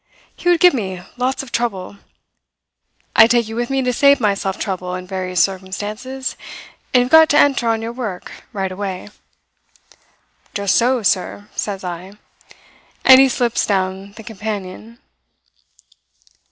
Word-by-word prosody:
He 350 - -1
would 350 -1 +4
give 360 +1 +6
me 190 -7 -3 0.2
lots 255 +2 -1
of 255 - -12
trouble. 200 -5 -3 1.2
I 220 - +8
take 235 -1 +2
you 225 - -7
with 240 +1 -2
me 270 -1 0
to 250 0 0
save 280 +3 +4
myself 200 -3 -1
trouble 185 -2 -4
in 185 0 -7
various 185 -2 0
circumstances; 210 +7 -4 0.6
and 250 - +5
you've 250 - -6
got 320 0 +7
to 290 - +3
enter 275 -4 +3
on 225 0 0
your 230 - -4
work 220 -8 -6 0.2
right 190 -2 -3
away.' 190 0 -5 1.5
"'Just 200 -2 +1
so, 245 0 +2
sir,' 195 +3 -1
says 195 -2 -4
I; 180 +2 -7 0.9
and 260 0 +9
he 270 - +5
slips 240 -2 0
down 190 0 -2
the 225 - -12
companion. 215 +1 -7
215 Hz, 145 wpm, -19 LUFS, 190-250 Hz, 1.5 s, and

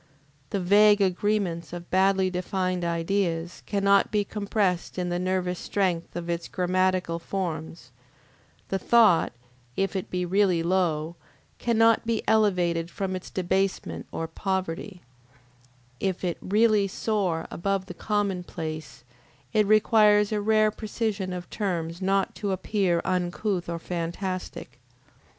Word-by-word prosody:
The 200 - -1
vague 205 +3 +5
agreements 190 -3 0
of 175 -1 -8
badly 190 0 +3
defined 185 0 -2
ideas 170 0 -1
cannot 200 -1 +3
be 210 -1 +2
compressed 200 -4 -1
in 180 -1 -1
the 175 0 -1
nervous 180 -1 -1
strength 180 -4 -1
of 175 -1 -4
its 170 0 -2
grammatical 185 -1 0
forms; 165 -6 -5 0.8
the 195 - -1
thought, 220 -4 +4 0.5
if 195 +1 0
it 190 - -3
be 180 0 -1
really 185 -2 +2
low, 170 -2 0 0.4
cannot 230 -1 +3
be 230 -1 -1
elevated 180 -6 +2
from 190 -1 -3
its 185 - -7
debasement 190 +1 -1
or 165 - -3
poverty; 185 +1 -3 1.0
if 190 -2 -2
it 175 -2 -2
really 210 0 +3
soar 190 -5 -1
above 195 +1 -1
the 180 - -8
commonplace, 175 - -3 0.5
it 215 -2 +3
requires 210 -1 +5
a 210 -1 0
rare 215 0 +3
precision 210 -3 -3
of 180 -1 -5
terms 170 -3 -3
not 195 +1 +1
to 200 -2 -3
appear 190 -2 0
uncouth 180 0 -1
or 170 - -2
fantastic. 180 +2 -5
185 Hz, 125 wpm, -26 LUFS, 175-205 Hz, 1.0 s, vague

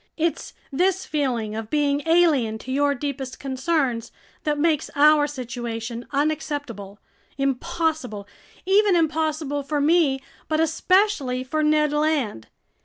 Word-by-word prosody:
It's 335 0 -2 0.2
this 370 +6 +1
feeling 245 -8 -1
of 220 -1 -5
being 290 0 +1
alien 305 -10 +3
to 255 +4 -8
your 285 +1 +2
deepest 270 -1 -5
concerns 265 -3 -1 0.3
that 300 -1 +1
makes 310 -1 +1
our 295 0 +5
situation 240 -3 -5
unacceptable, 285 -8 -3 0.4
impossible, 275 -4 -2 0.4
even 395 0 +4
impossible 310 -3 0
for 290 +1 -2
me 295 -2 +3 0.3
but 310 0 0
especially 325 -5 +2
for 310 +4 -2
Ned 300 -1 +2
Land. 295 - 0
290 Hz, 115 wpm, -23 LUFS, 255-315 Hz, 0.4 s, our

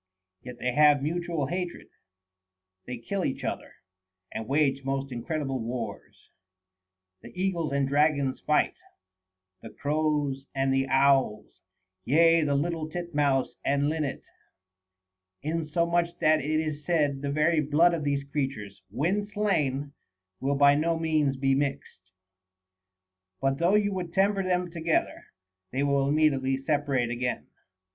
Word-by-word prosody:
Yet 125 -1 -9
they 125 +1 -1
have 145 0 +5
mutual 170 -1 -2
hatred; 175 +4 -4 1.0
they 125 - -5
kill 185 - -3
each 130 - -3
other, - - -4 0.6
and 110 - -5
wage 140 -1 +1
most 135 0 -3
incredible 135 +2 -3
wars. 115 -3 -6 0.9
The - - -12
eagles 175 -5 -1
and 140 0 +1
the - - -4
dragons 140 -2 +2
fight, - - +2 0.9
the - - -9
crows 145 -2 -1
and 135 0 +1
the 135 0 +1
owls, 135 -5 +2 0.4
yea, 165 +4 +4
the 145 -1 +1
little 160 +2 -1
tit 175 0 -6
mouse 140 -3 +1
and 140 +1 +1
linnet; 155 -3 -3 1.2
insomuch 170 +2 0
that 155 0 +3
it 155 +2 0
is 155 -2 -3
said, 145 -5 +1
the 140 - -2
very 155 +2 +2
blood 155 +4 +3
of 165 -3 -2
these 140 -1 0
creatures, 135 -9 -4
when 190 - -1
slain, 145 -10 0 0.5
will 140 +2 0
by 140 0 +6
no 165 +3 +1
means 155 -4 +1
be 135 0 +2
mixed; 135 -9 -3 1.3
but 135 0 0
though 175 +4 +3
you 205 -1 +2
would 175 -3 -5
temper 195 +1 +3
them 180 -2 -1
together, 165 -1 -1 0.4
they 135 +2 -1
will 140 -1 +2
immediately 140 -3 +2
separate 135 -3 0
again. 125 +1 -2
145 Hz, 135 wpm, -27 LUFS, 135-165 Hz, 1.3 s, by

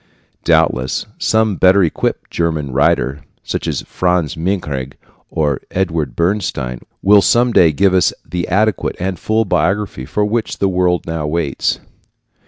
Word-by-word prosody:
Doubtless 65 +1 +2
some 110 -3 +1
better 95 +1 +5
equipped 80 - -2
German 80 -5 -1
writer, 70 +1 +1 0.2
such - - -3
as - - -2
Franz 90 -4 0
Mehring 75 -7 -3 0.4
or 75 -4 -1
Eduard 85 -8 -2
Bernstein, 85 -9 -1 0.2
will 100 +1 +6
some 120 +4 +3
day 85 -6 +5
give 95 +6 +2
us 90 -2 +3
the 85 +2 -3
adequate 105 +1 +1
and 95 -1 -3
full 110 +1 +1
biography 95 -8 -1
for 105 +9 0
which 110 +1 -2
the 100 - +1
world 90 -1 +1
now 80 -2 -3
waits. 75 -3 -1
90 Hz, 140 wpm, -17 LUFS, 75-100 Hz, 0.4 s, will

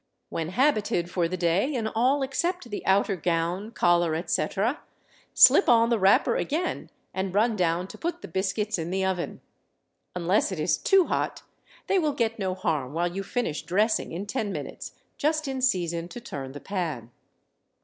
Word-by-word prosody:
When 160 -1 -3
habited 210 -6 +1
for 175 -2 +1
the 185 +2 -4
day 175 - +1
in 230 -3 -1
all 255 +6 +1
except 340 +4 -2
the 205 - -4
outer 195 +1 +3
gown, 175 +4 -1
collar, 175 -6 +2
etc., 190 - -1 0.6
slip - - +7
on 230 -1 +5
the 230 - +2
wrapper 195 +1 +4
again 335 +5 -2 0.2
and 190 0 -3
run 220 +2 +3
down 175 -1 0
to - - -11
put 340 +1 -4
the - - -6
biscuits 190 +3 -1
in 165 +1 -3
the 190 +1 0
oven. 185 -2 -3 0.7
Unless 180 +4 +1
it 185 - -4
is 155 0 +1
too 385 -2 +4
hot, - - -2 0.4
they 390 - +2
will 305 -4 0
get 230 -4 -1
no 190 -2 -1
harm 150 -7 -2
while 175 +2 -1
you 195 - -2
finish 195 -6 -2
dressing 215 +5 0
in 180 +5 -4
ten 210 -1 -2
minutes, - - -6 0.3
just 310 0 0
in 265 -1 -3
season 175 -8 0
to 240 - -8
turn 135 - -7
the 145 - -7
pan. 150 - -4
190 Hz, 175 wpm, -26 LUFS, 170-235 Hz, 0.7 s, slip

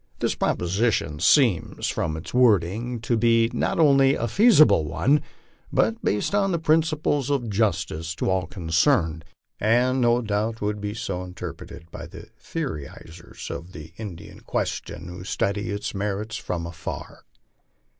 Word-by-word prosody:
This - - 0
proposition 90 -4 0
seems, 110 - +3
from 80 -1 -2
its 80 - -9
wording, 115 0 +2
to 120 +1 0
be 115 0 +3
not - - 0
only 140 -3 +5
a 115 - -2
feasible 155 - +5
one, 135 - +2 0.5
but 110 +1 +1
based 105 - 0
on 195 -4 +2
principles 155 -3 +1
of 125 -6 -1
justice 85 -6 -1
to - - -2
all 95 -3 0
concerned, 80 - +1 0.4
and 125 +4 +2
no 120 0 +3
doubt 110 +1 -1
would 105 0 -2
be 105 +1 -4
so 95 -5 -4
interpreted 90 -2 -9
by - - -8
the - - -11
theorizers 80 - -7
on 85 - -6
the 80 -1 -10
Indian 100 -7 -8
question 85 - -4
who 90 0 -8
study 100 +2 -1
its 105 +3 -3
merits 105 +2 -3
from 85 -5 -4
afar. 85 -2 -7
105 Hz, 140 wpm, -24 LUFS, 85-125 Hz, 0.5 s, only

